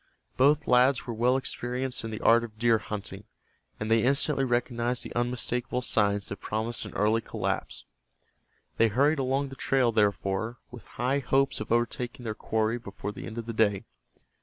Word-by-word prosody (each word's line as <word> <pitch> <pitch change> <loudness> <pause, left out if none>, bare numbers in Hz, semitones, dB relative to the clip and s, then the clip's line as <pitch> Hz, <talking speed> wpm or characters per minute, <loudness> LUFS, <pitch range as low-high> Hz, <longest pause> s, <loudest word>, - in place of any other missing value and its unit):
Both 145 +3 +3
lads 125 +1 +4
were 120 - -4
well 125 +3 +2
experienced 125 -1 -3
in 115 - -4
the 110 0 -5
art 115 +1 +5
of 110 -2 -9
deer 115 0 +3
hunting, 100 -2 -6 0.5
and 110 +1 -3
they 115 0 +5
instantly 140 +2 +2
recognized 120 -1 0
the - - -8
unmistakable 125 +1 -1
signs 105 -4 +1
that 100 - -5
promised 110 +2 -2
an - - -10
early 110 +3 +2
collapse. - - -4 0.9
They 115 - +5
hurried 140 +8 +2
along 135 +1 0
the 135 - -9
trail, 130 -3 +2
therefore, 105 +1 0
with 120 -2 -11
high 130 +4 +1
hopes 135 +1 +1
of 110 - -6
overtaking 120 +2 -1
their 110 -2 -3
quarry 110 +2 -1
before 105 -1 -6
the - - -8
end 115 - -8
of 115 - -4
the 115 - -5
day. 105 -3 +2
120 Hz, 175 wpm, -28 LUFS, 110-125 Hz, 0.9 s, art